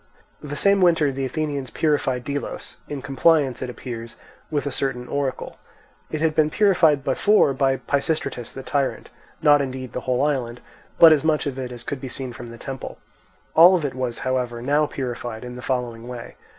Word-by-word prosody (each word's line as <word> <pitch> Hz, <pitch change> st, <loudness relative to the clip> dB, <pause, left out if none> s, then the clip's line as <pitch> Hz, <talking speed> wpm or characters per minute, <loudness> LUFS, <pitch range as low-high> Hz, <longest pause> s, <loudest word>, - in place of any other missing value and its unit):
The 145 Hz, 0 st, -6 dB
same 200 Hz, +5 st, +3 dB
winter 165 Hz, -5 st, +4 dB
the 135 Hz, 0 st, -3 dB
Athenians 140 Hz, -1 st, -3 dB
purified 140 Hz, -5 st, 0 dB
Delos, 140 Hz, +2 st, -5 dB
in 140 Hz, -3 st, -5 dB
compliance, 140 Hz, -2 st, +2 dB
it 130 Hz, -, -3 dB
appears, 120 Hz, -2 st, -7 dB, 0.3 s
with 150 Hz, -2 st, -1 dB
a 145 Hz, -, -2 dB
certain 125 Hz, -2 st, -2 dB
oracle. 140 Hz, -2 st, -3 dB, 0.5 s
It 155 Hz, -, -3 dB
had 160 Hz, -1 st, +2 dB
been 155 Hz, 0 st, +3 dB
purified 165 Hz, -7 st, +3 dB
before 205 Hz, -7 st, +3 dB
by 135 Hz, 0 st, +1 dB
Pisistratus 140 Hz, -4 st, -2 dB
the 135 Hz, -, -8 dB
tyrant; 140 Hz, -1 st, -2 dB, 0.3 s
not 145 Hz, -1 st, +6 dB
indeed 130 Hz, -2 st, -5 dB
the -, -, -2 dB
whole 130 Hz, +1 st, 0 dB
island, 125 Hz, -5 st, -1 dB, 0.4 s
but 165 Hz, -2 st, +9 dB
as 150 Hz, -, +1 dB
much 155 Hz, -1 st, +1 dB
of 135 Hz, -2 st, -3 dB
it 125 Hz, -1 st, -4 dB
as 120 Hz, -1 st, -9 dB
could 140 Hz, -2 st, -5 dB
be 130 Hz, -, -5 dB
seen 130 Hz, -1 st, -6 dB
from 120 Hz, -1 st, -9 dB
the 115 Hz, -, -10 dB
temple. 135 Hz, +2 st, -7 dB, 0.6 s
All 175 Hz, +4 st, +8 dB
of 165 Hz, -5 st, -1 dB
it 140 Hz, -, -2 dB
was, 125 Hz, -2 st, -3 dB
however, 125 Hz, -2 st, -1 dB
now 145 Hz, +5 st, +2 dB
purified 120 Hz, -4 st, -5 dB
in 125 Hz, 0 st, -7 dB
the 125 Hz, -, -8 dB
following 120 Hz, -3 st, -3 dB
way. 125 Hz, -2 st, -8 dB
135 Hz, 190 wpm, -23 LUFS, 125-150 Hz, 0.6 s, but